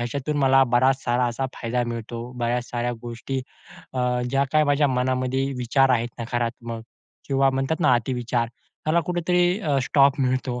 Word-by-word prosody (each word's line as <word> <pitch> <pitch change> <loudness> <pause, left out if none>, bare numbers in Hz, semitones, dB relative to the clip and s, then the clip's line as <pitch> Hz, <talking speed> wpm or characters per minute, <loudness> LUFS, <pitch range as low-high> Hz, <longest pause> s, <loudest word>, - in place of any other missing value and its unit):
याच्यातून 140 +5 -2
मला 135 -1 +5
बराच 130 +2 +3
सारा 125 +1 +1
असा 120 +3 -2
फायदा 120 +1 -2
मिळतो. 115 0 -5 0.2
बऱ्याच 120 +1 0
साऱ्या 120 0 -1
गोष्टी 120 +3 -4 0.5
अ, 130 - -4 0.3
ज्या 135 +1 +2
काही 155 0 +4
माझ्या 145 0 +3
मनामध्ये 130 +1 0
विचार 130 +2 +3
आहेत 120 -1 +2
नकारात्मक 115 0 -3 0.5
किंवा 135 0 +3
म्हणतात 135 +5 -1
ना 150 -6 +4
अतिविचार 120 0 -1 0.4
त्याला 160 +2 +3
कुठेतरी 180 +1 +1
अ, 145 -7 +1
स्टॉप 140 +1 +3
मिळतो. 130 -1 0
130 Hz, 155 wpm, -24 LUFS, 120-140 Hz, 0.5 s, मला